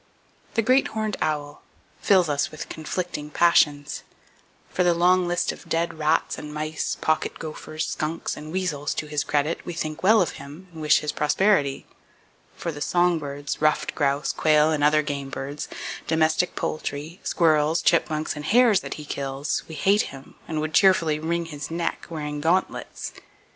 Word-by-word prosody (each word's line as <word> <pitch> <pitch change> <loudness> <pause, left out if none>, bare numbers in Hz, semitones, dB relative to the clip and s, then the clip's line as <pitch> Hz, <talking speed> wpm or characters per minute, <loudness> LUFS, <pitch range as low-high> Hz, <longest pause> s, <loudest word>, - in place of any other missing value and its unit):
The 225 - +2
Great 255 +4 +4
Horned 215 -1 -2
Owl 150 -1 -2 0.4
fills 185 -4 +4
us 145 -1 0
with 155 - -8
conflicting 160 -1 -4
passions. 150 -3 +3 0.7
For 180 - +1
the 175 -1 +3
long 180 +1 +4
list 175 0 0
of - - -12
dead 165 -1 -1
rats 155 +1 +1
and 150 - -7
mice, 155 0 -3
pocket 155 0 0
gophers, 155 0 -5
skunks, 155 +2 -3
and 155 +1 -8
weasels 165 -6 -2
to - - -3
his 150 -1 -1
credit, 150 +2 0
we 175 - -5
think 155 -1 -4
well 215 +4 +6
of 180 - +1
him, 150 +7 -11
and 160 - -8
wish 150 0 +4
his 150 - -2
prosperity. 150 -2 +2 0.7
For 170 - -3
the 145 -1 -9
song 175 0 +2
birds, 145 -1 -5
ruffed 155 0 +2
grouse, 140 -1 0
quail, 155 0 +4
other 150 +1 +4
game 140 -1 -4
birds, 140 +2 -5 0.4
domestic 160 +2 +2
poultry, 155 +3 -4
squirrels, 155 -1 +2
chipmunks 155 -2 +1
and 150 0 -6
hares 225 +1 +5
that - - -6
he 150 - -9
kills, 140 0 -2
we 160 - -8
hate 200 +7 +2
him, 135 0 -12
and 155 -2 -2
would 155 0 -3
cheerfully 165 -6 +4
wring 170 +2 -1
his 150 -3 -7
neck, 165 0 -3
wearing 150 -2 -4
gauntlets. 175 +4 -1
155 Hz, 165 wpm, -24 LUFS, 150-170 Hz, 0.7 s, well